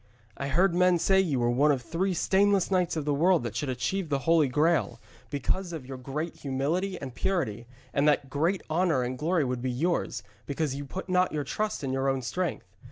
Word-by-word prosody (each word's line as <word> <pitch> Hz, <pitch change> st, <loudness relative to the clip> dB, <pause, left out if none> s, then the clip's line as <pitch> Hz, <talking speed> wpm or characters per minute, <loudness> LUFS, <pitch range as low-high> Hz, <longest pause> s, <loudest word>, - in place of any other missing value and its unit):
I 140 Hz, -, -4 dB
heard 175 Hz, +6 st, +3 dB
men 180 Hz, 0 st, +4 dB
say 190 Hz, +3 st, +3 dB
you 160 Hz, -9 st, +1 dB
were 120 Hz, 0 st, +2 dB
one 145 Hz, +5 st, +4 dB
of 130 Hz, -3 st, -1 dB
three 180 Hz, +7 st, -1 dB
stainless 195 Hz, +2 st, +2 dB
knights 180 Hz, -2 st, +1 dB
of 150 Hz, -, -2 dB
the 145 Hz, -, +1 dB
world 170 Hz, +1 st, +3 dB
that 115 Hz, -2 st, -5 dB
should 135 Hz, +4 st, -2 dB
achieve 165 Hz, +8 st, -2 dB
the 140 Hz, -, +1 dB
Holy 165 Hz, -3 st, +4 dB
Graal, 135 Hz, -, +1 dB, 0.3 s
because 170 Hz, +7 st, -2 dB
of 155 Hz, -6 st, -6 dB
your 130 Hz, 0 st, -7 dB
great 150 Hz, +6 st, -4 dB
humility 160 Hz, +8 st, -2 dB
and 135 Hz, -3 st, -7 dB
purity, 120 Hz, -, -2 dB, 0.3 s
and 140 Hz, +2 st, +2 dB
that 145 Hz, -2 st, +2 dB
great 160 Hz, +8 st, 0 dB
honour 160 Hz, -5 st, +1 dB
and 125 Hz, +1 st, -3 dB
glory 160 Hz, +4 st, +1 dB
would 125 Hz, -2 st, -2 dB
be 130 Hz, -, -1 dB
yours, 145 Hz, -, -1 dB, 0.2 s
because 145 Hz, 0 st, -1 dB
you 140 Hz, +1 st, -5 dB
put 185 Hz, +8 st, -6 dB
not 180 Hz, 0 st, +2 dB
your 150 Hz, -1 st, -1 dB
trust 210 Hz, +6 st, -3 dB
in 130 Hz, -1 st, -2 dB
your 135 Hz, +1 st, +1 dB
own 135 Hz, -1 st, -1 dB
strength. 180 Hz, +8 st, -2 dB
150 Hz, 215 wpm, -28 LUFS, 130-180 Hz, 0.3 s, men